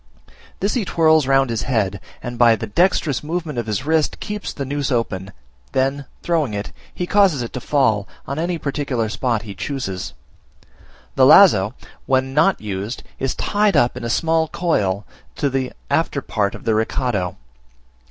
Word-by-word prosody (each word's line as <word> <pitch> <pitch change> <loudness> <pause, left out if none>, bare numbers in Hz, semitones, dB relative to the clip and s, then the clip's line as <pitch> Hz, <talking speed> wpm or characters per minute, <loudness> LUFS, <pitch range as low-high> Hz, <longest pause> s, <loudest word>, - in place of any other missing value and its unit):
This 200 +2 +1
he 250 - +1
whirls 160 -5 +3
round 135 -2 +3
his 115 - -1
head, 100 -7 -1 0.2
and 120 0 -6
by 120 -2 +6
the 105 - -5
dexterous 160 - +1
movement 160 -4 -3
of 115 - -4
his 105 +4 -2
wrist 160 -1 +1
keeps 210 0 -5
the 140 - -5
noose 140 +1 -2
open; 100 -6 -2 0.4
then, 135 +1 0 0.2
throwing 155 -10 0
it, 100 -8 -4 0.2
he 180 - -3
causes 185 -9 +3
it 115 - -7
to 125 - -4
fall 110 -10 +1 0.2
on 140 +3 -4
any 170 +1 -1
particular 140 -6 -2
spot 115 -1 -1
he 105 -3 -7
chooses. 95 -2 -4 1.0
The 130 -1 +5
lazo, 125 - +6 0.3
when 130 0 +1
not 160 +7 +3
used, 105 +2 -5 0.2
is 135 -1 -1
tied 205 -1 +1
up 120 - +3
in - - -7
a 115 - -2
small 160 +5 +1
coil 105 - 0 0.3
to 140 -2 0
the 130 -1 -1 0.2
after - - 0
part 100 -2 -1
of - - -11
the 115 - +1
recado. 110 -4 -1
130 Hz, 170 wpm, -20 LUFS, 110-155 Hz, 1.0 s, by